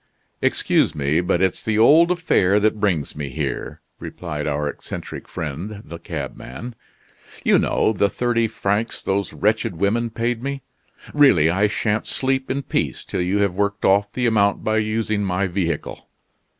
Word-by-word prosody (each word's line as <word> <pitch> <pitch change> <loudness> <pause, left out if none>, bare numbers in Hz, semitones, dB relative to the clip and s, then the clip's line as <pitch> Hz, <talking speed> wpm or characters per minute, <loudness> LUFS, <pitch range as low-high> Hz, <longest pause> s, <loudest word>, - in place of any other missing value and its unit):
"Excuse - - +2
me, 75 +3 +1
but 90 +1 +1
it's 95 - 0
the 110 -1 0
old 155 +10 +6
affair 105 - +2
that 105 0 +1
brings 90 -8 0
me 75 -2 -4
here," 65 - -4 0.2
replied 75 -4 -5
our 75 0 -1
eccentric - - -7
friend 90 +8 -6
the 85 +2 -9
cabman. 115 - -7 0.7
"You - - +4
know 110 - +1
the 100 0 +2
thirty 120 -1 0
francs 105 +2 -2
those 100 +1 -1
wretched 105 -3 0
women 110 +7 0
paid 115 +1 -2
me. 140 0 -4 0.5
Really, 90 - +5
I 100 +4 +2
shan't 105 +1 -1
sleep 130 0 0
in 140 +1 -2
peace - - -2
till - - -3
you 90 +3 0
have 100 -3 0
worked 100 +1 -1
off 100 +1 +3
the 125 - -1
amount 100 -3 +2
by 110 0 +1
using 110 -1 -1
my 95 0 0
vehicle. 85 -4 -3
100 Hz, 160 wpm, -21 LUFS, 90-115 Hz, 0.7 s, old